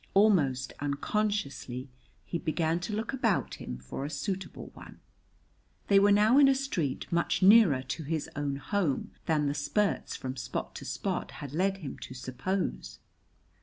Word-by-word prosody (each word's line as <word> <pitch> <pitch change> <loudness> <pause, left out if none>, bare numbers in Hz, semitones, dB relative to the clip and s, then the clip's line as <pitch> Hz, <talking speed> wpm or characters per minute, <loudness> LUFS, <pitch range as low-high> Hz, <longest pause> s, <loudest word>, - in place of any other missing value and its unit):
Almost 155 -11 +3
unconsciously 145 -4 -2 0.4
he 170 - -3
began 165 0 0
to 180 +5 -4
look 225 +5 -3
about 230 -7 0
him 60 - -5
for 65 - -6
a 145 - -3
suitable 185 +6 -4
one. - - -13 0.9
They 200 -1 +7
were 205 +1 +5
now 215 +6 +5
in 280 - +8
a 270 - +5
street 180 - -2
much 170 +2 +1
nearer 190 - +7
to 145 +5 -4
his 155 0 -2
own 145 -1 -1
home 155 0 -1 0.2
than 155 -3 +2
the 140 - +1
spurts 195 +8 0
from 130 0 -5
spot 130 0 -4
to - - -8
spot - - -2
had 140 -1 -8
led 190 +4 +1
him 135 - -6
to 130 - -8
suppose. 130 +10 -3
165 Hz, 160 wpm, -30 LUFS, 140-205 Hz, 0.9 s, in